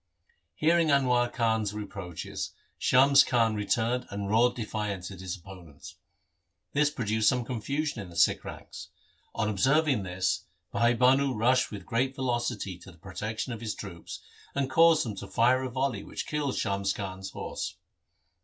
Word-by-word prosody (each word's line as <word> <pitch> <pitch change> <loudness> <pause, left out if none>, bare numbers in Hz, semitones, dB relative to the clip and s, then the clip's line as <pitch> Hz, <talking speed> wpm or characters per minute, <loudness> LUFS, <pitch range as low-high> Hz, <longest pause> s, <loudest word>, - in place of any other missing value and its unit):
Hearing 165 +1 +3
Anwar 125 -4 +3
Khan's 110 -3 0
reproaches, 100 -5 -6 0.3
Shams 135 +1 +6
Khan 115 -3 +2
returned 115 +4 0
and 100 0 -4
roared 120 +3 +4
defiance 105 -5 -4
at 95 - -10
his 95 0 -5
opponents. 85 -3 -12 0.8
This 145 0 +3
produced 110 -6 +1
some 125 -2 0
confusion 135 +2 -2
in 95 - -9
the 85 - -13
Sikh 85 - +3
ranks. - - -9 0.5
On 110 - 0
observing 135 +4 +2
this, 90 0 -1 0.3
Bhai 120 +1 +3
Bhanu 130 +2 +4
rushed 125 +4 +3
with 100 -3 -8
great 130 +3 0
velocity 120 -8 -2
to 85 - -13
the 85 - -19
protection 110 +7 -4
of 115 - -7
his 110 -3 -3
troops, 85 -5 -8 0.3
and 135 -1 -1
caused 165 0 +5
them 110 - -3
to - - -7
fire 125 +3 +3
a 130 - -3
volley 130 -4 -1
which - - -6
killed 150 -3 -2
Shams 100 -2 0
Khan's 95 -1 -6
horse. - - -5
115 Hz, 155 wpm, -28 LUFS, 100-130 Hz, 0.8 s, Shams